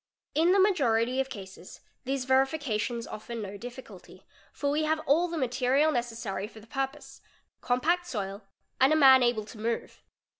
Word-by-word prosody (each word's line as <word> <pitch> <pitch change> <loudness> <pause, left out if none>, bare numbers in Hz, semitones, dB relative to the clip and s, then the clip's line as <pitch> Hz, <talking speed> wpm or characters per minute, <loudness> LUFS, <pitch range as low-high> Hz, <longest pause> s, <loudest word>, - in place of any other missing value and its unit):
7 320 +3 +3
In - - +5
the - - +4
majority 255 - +2
of 270 - -4
cases 190 -6 -10 0.3
these 265 0 -2
verifications 260 -4 0
offer 225 +2 -8
no 205 -3 -6
difficulty, 245 +5 -11 0.3
for 285 -1 -2
we 300 +2 +1
_ - - 0
have 315 0 +1
all 325 +6 +3
the 335 -1 -5
material 260 +3 +2
necessary 230 -6 -3
for 220 - -14
the 215 - -16
purpose: 270 +4 -5 0.4
compact 340 +9 +1
soil 200 - -4 0.4
and 265 +3 +5
a - - +5
man 265 -3 +7
able 240 -3 +1
to 215 0 -12
move. 230 +1 -3
255 Hz, 175 wpm, -28 LUFS, 225-285 Hz, 0.4 s, man